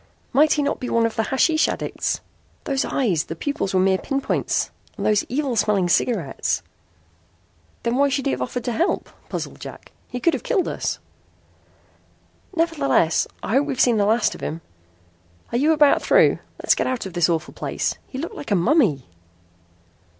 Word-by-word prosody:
"Might 305 +3 +5
he 295 - +1
not 285 - -1
be 250 - -4
one 230 0 +2
of 230 - -2
the - - +1
hashish 310 +6 +3
addicts? - - -2 0.4
Those 270 -1 0
eyes 190 - 0
the 165 - -6
pupils 280 - -2
were - - +4
mere 190 0 +3
pinpoints 275 -1 -1 0.3
and - - -3
those 210 -1 +3
evil 270 -1 -1
smelling 205 -4 +2
cigarettes." 170 - 0 1.2
"Then 235 +2 0
why 280 +1 +4
should 275 -1 -1
he - - +2
have 125 -1 -3
offered 230 - -3
to 245 - -2
help?" 335 - 0 0.2
puzzled - - -5
Jack. - - -10 0.2
"He 250 - -5
could 335 +6 +2
have - - -2
killed 390 -7 0
us." - - -2 1.6
"Nevertheless 305 - +2 0.2
I - - -3
hope 275 +4 +3
we've 270 -3 -3
seen 240 -4 +4
the 205 - +3
last 225 +1 +2
of - - -11
him. 160 +2 -4 0.9
Are 235 - +1
you 300 +4 +4
about 300 -2 +5
through? - - +4 0.2
Let's - - +3
get - - -1
out 255 -4 -2
of 190 - -7
this 175 -1 +2
awful 165 -1 -1
place. - - -2
He 260 - -8
looked 315 +5 -4
like 285 - -8
a 205 - +3
mummy!" 190 - +2
245 Hz, 180 wpm, -22 LUFS, 195-285 Hz, 1.6 s, Might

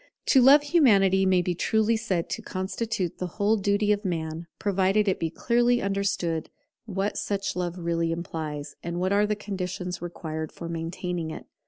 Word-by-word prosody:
To 265 - +7
love 280 +4 +7
Humanity 200 - +4
may 185 -1 +3
be 180 - 0
truly 220 +5 +2
said 195 -7 -1
to - - -3
constitute 190 0 -3
the 180 - -2
whole 210 +1 +3
duty 205 0 +1
of 205 +1 +1
Man; 165 -2 -3
provided 200 +1 +2
it 190 - +1
be 165 - -1
clearly 240 +6 +2
understood 195 -5 -1 0.4
what 200 -1 -2
such 200 -1 -2
love 180 -1 -2
really 170 -1 -1
implies, 160 -3 -5
and 170 0 -4
what 185 +2 +1
are 205 +1 +3
the 210 - 0
conditions 185 -3 -4
required 160 -2 -5
for 170 - -8
maintaining 170 0 -3
it. - - -7
190 Hz, 170 wpm, -26 LUFS, 170-210 Hz, 0.4 s, To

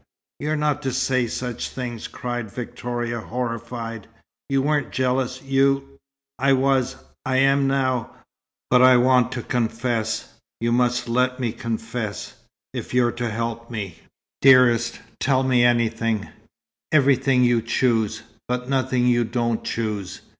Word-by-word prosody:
"You're 155 +2 -1
not 150 -1 0
to 135 -3 -2
say 130 -1 +1
such 125 +1 -4
things," 120 -3 -5
cried 120 -4 -5
Victoria, 120 0 -4
horrified. 115 -2 -5 0.4
"You 135 -1 +2
weren't 145 -3 +1
jealous. 130 0 -1
You 135 0 +1 0.2
" 135 0 -67
"I 135 +1 +4
was. 135 -1 +2 0.3
I 130 0 0
am 135 +1 +4
now. 130 -3 0 0.6
But 125 - +6
I 130 0 +7
want 125 0 +4
to 120 -2 -4
confess. 115 -1 -2 0.3
You 115 +1 0
must 125 0 +1
let 125 +2 +1
me 120 -3 -1
confess, 115 -3 -4 0.4
if - - -5
you're 120 -1 +3
to 120 0 -3
help 115 +1 -4
me." 100 -7 -5 0.4
"Dearest, 120 -3 +5 0.2
tell 135 -1 +2
me 125 -2 +3
anything 115 -2 +1 0.6
everything 135 -3 +4
you 120 -1 +3
choose, 110 -2 0 0.2
but 125 0 -2
nothing 130 -2 +1
you 120 -1 +3
don't 115 0 -1
choose. 105 -5 -3
125 Hz, 135 wpm, -23 LUFS, 115-130 Hz, 0.6 s, I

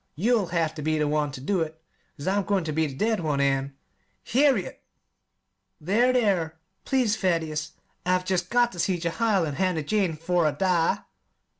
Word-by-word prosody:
You'll 210 - +2
have 165 -2 0
ter 155 - -7
be 155 +1 0
the 150 -1 +1
one 150 -1 0
ter 130 -1 -9
do 190 +3 0
it, 160 0 -4 0.4
'cause 145 - -7
I'm 200 +2 +2
goin' 195 -2 0
ter 160 - -3
be 160 +1 +1
the 135 - -8
dead 220 +7 +1
one, 150 -4 -1
an' 135 0 0 0.2
" - - -44
"Harriet!" 260 -7 +2 1.0
"There, 215 +10 +2
there, 190 -10 +1 0.3
please, 250 -6 +2
Thaddeus! 160 -5 -1 0.3
I've 180 0 +1
jest 185 -1 -1
got 240 0 +3
ter 175 - -10
see 185 +1 +1
Jehiel 185 +3 +1
and 145 -3 -4
Hannah 185 -4 0
Jane 185 -2 0
'fore 170 0 +1
I - - +2
die!" 180 -4 +1
175 Hz, 185 wpm, -26 LUFS, 155-200 Hz, 1.0 s, got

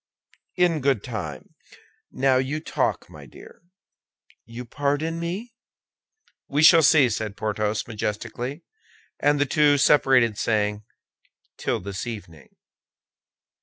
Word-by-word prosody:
"In 175 -3 +2
good 135 -6 +1
time. 85 - -7 0.6
Now 135 -1 +2
you 135 +4 -1
talk, 155 - -2
my - - -13
dear." - - -15 0.8
"You 120 +2 -9
pardon 145 +6 -2
me?" 190 +8 -5 0.9
"We 145 +2 +1
shall 165 +1 +8
see," 150 -3 +5
said 110 -2 -4
Porthos, 105 0 -2
majestically; 120 +6 -5 0.6
and 145 0 +2
the 145 - +3
two 145 +1 +3
separated 130 -6 +3
saying, 105 -1 -1 0.7
"Till - - -2
this 100 +3 -6
evening." 95 -10 -9
130 Hz, 110 wpm, -24 LUFS, 105-150 Hz, 0.9 s, shall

